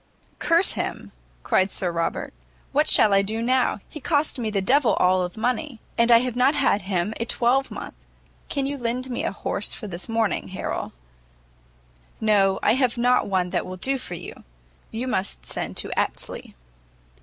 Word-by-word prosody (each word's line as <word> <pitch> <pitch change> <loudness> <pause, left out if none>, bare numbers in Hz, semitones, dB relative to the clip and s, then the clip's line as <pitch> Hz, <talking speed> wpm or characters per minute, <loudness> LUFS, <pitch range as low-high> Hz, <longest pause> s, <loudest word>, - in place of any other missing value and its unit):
"Curse 335 +2 +3
him!" - - -4 0.3
cried 190 +1 +2
Sir 180 -2 0
Robert, 170 0 -2 0.4
"what - - +2
shall 210 - +5
I 195 - +5
do 215 +3 -3
now? 250 -3 +1
he 305 - -9
cost 295 -1 +2
me 225 -3 -1
the 205 -2 0
d 195 +7 +1
l - - +8
and 290 - -10
all 185 0 +3
of 180 +3 -4
money, 250 +2 -2 0.2
and 235 0 +3
I 230 0 +7
have 250 -2 -3
not 255 +4 +3
had 210 -7 +2
him 190 +1 -1
a 230 - -1
twelvemonth. 255 +3 0 0.6
Can 275 -2 -1
you 280 0 -3
lend 250 +2 -3
me 240 - -2
a - - -1
horse 200 0 -2
for - - -8
this 185 +1 -7
morning, 225 -2 0
Harrel?" 185 - -4 1.3
"No, 200 -3 +3
I - - +4
have 255 -1 +1
not 245 +1 +3
one 185 -2 0
that - - 0
will 185 0 -7
do 265 +7 0
for 180 - -5
you. - - -10 0.5
You 235 +3 -4
must 195 -6 0
send - - -2
to - - -1
Astley." - - -2
230 Hz, 185 wpm, -24 LUFS, 195-255 Hz, 1.3 s, l